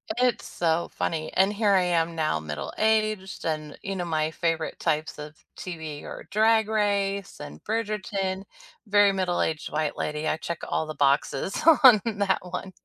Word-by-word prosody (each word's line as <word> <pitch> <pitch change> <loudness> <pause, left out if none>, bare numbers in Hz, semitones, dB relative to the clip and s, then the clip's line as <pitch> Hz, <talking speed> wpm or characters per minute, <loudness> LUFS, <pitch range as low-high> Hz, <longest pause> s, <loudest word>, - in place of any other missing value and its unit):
It's 250 -2 +1
so 170 0 0
funny, 155 -1 -2
and 190 +2 +3
here 210 -1 +1
I 190 - +5
am 170 -1 +1
now, 155 - 0
middle-aged, 210 - -1
and, 155 -2 -3
you 195 - -4
know, 175 -1 -3
my 155 -1 0
favorite 165 -1 -2
types 155 0 -1
of 150 +1 -8 0.2
TV 160 -5 -7
are - - -8
Drag 220 0 +3
Race 200 -2 -1
and 75 +1 -9
Bridgerton. 205 -3 -2 0.4
Very 205 0 +5
middle-aged 175 -5 -1
white 155 0 -2
lady, 150 +1 -3
I 155 - +1
check 170 +1 -5
all 160 - 0
the 155 - -7
boxes 140 +5 +1 0.2
on 245 -5 +9 0.2
that 195 -2 +2
one. 180 +1 -6
180 Hz, 160 wpm, -26 LUFS, 155-205 Hz, 0.4 s, on